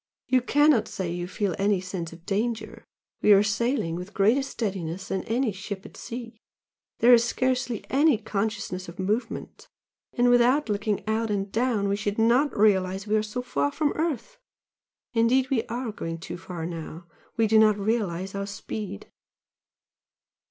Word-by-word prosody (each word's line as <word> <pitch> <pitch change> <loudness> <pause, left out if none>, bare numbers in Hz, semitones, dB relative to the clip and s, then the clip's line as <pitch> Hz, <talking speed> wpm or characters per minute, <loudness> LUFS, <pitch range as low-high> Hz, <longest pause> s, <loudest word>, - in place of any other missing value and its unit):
You 255 0 +3
cannot 290 -1 +4
say 190 -4 -4
you 175 0 -3
feel 200 0 -1
any 200 -1 +2
sense 180 -2 -5
of 165 +1 -14
danger? 220 +3 -2 0.4
we 210 - +7
are 200 0 +6
sailing 220 -3 0
with 180 +4 -7
greater 220 +7 +4
steadiness 195 -8 -4
than 190 - -1
any 240 +1 0
ship 195 0 -7
at - - -12
sea 230 -2 -8 0.6
there 245 +1 +8
is 235 -1 +6
scarcely 250 -1 -1
any 290 -1 +4
consciousness 205 -4 -3
of 170 - -11
movement 215 +5 -3 0.5
and 245 -1 +3
without 245 +3 +4
looking 210 0 -1
out 220 +1 0
and 200 -1 -2
down, 225 -3 +1
we 200 - +1
should 205 0 -2
not 240 +6 +3
realise 190 -2 +2
we 215 0 +1
are 215 - +3
so 215 +4 -4
far 145 - 0
from 295 - 0
earth. 335 - -3 0.7
Indeed 250 +3 +3
we 235 -4 +1
are 240 -1 -3
going 165 -5 -5
too 170 +1 -7
far 175 -3 -6
now 165 0 -7 0.3
we 225 - +4
do 220 0 +5
not 215 -1 +5
realize 195 -4 -1
our 200 0 -3
speed." 200 - -6
215 Hz, 165 wpm, -26 LUFS, 190-240 Hz, 0.7 s, there